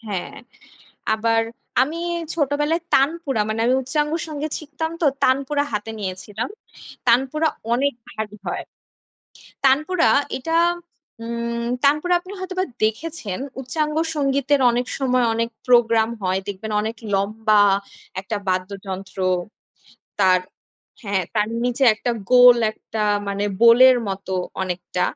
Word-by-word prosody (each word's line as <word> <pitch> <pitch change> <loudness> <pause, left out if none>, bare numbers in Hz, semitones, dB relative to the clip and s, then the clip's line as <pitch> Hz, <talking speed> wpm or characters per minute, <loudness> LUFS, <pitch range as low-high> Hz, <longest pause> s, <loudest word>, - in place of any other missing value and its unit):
হ্যাঁ। 205 -5 -5 0.8
আবার 225 +1 +2 0.4
আমি 300 +5 -1 0.4
ছোটবেলায় 295 +2 0
তানপুরা 275 -4 +2
মানে 220 +1 -2
আমি 250 - +3
উচ্চাঙ্গসঙ্গীত 300 +2 -2
শিখতাম 320 +1 -5
তো। - - +2 0.2
তানপুরা 275 +2 +2
হাতে 210 +2 -3
নিয়েছিলাম। 200 - -4 0.6
তানপুরা 270 +6 +3 0.3
অনেক 280 +3 +1 0.2
ভারী 210 -1 -6
হয়। - - -3 1.0
তানপুরা। 305 +4 +3 0.3
এটা 325 +5 -2 0.7
উম 235 0 -3 0.2
তানপুরা 300 +5 +3
আপনি 370 +2 -12
হয়তোবা 370 0 -2 0.2
দেখেছেন, 220 - -2 0.2
উচ্চাঙ্গসঙ্গীতের 290 -1 0
অনেক 245 +1 -1
সময় 255 -2 +2
অনেক 230 +1 -1 0.2
প্রোগ্রাম 230 -2 +4
হয়, 185 0 0
দেখবেন 205 +2 -5
অনেক 220 +2 -3 0.2
লম্বা 210 +2 +2 0.6
একটা 210 +2 -3
বাদ্যযন্ত্র। 190 +1 -4 1.0
তার 185 -2 +5 0.6
হ্যাঁ, 200 -3 0
তার 210 0 +1 0.2
নিচে 245 +2 +1
একটা 240 +3 -2 0.2
গোল 245 -1 +9 0.2
একটা 220 0 -7 0.3
মানে 200 +1 -1 0.2
bowl 235 0 +7
এর 255 - +5
মতো 195 -1 -5 0.3
অনেকটা। 180 0 -3
240 Hz, 110 wpm, -22 LUFS, 210-295 Hz, 1.0 s, গোল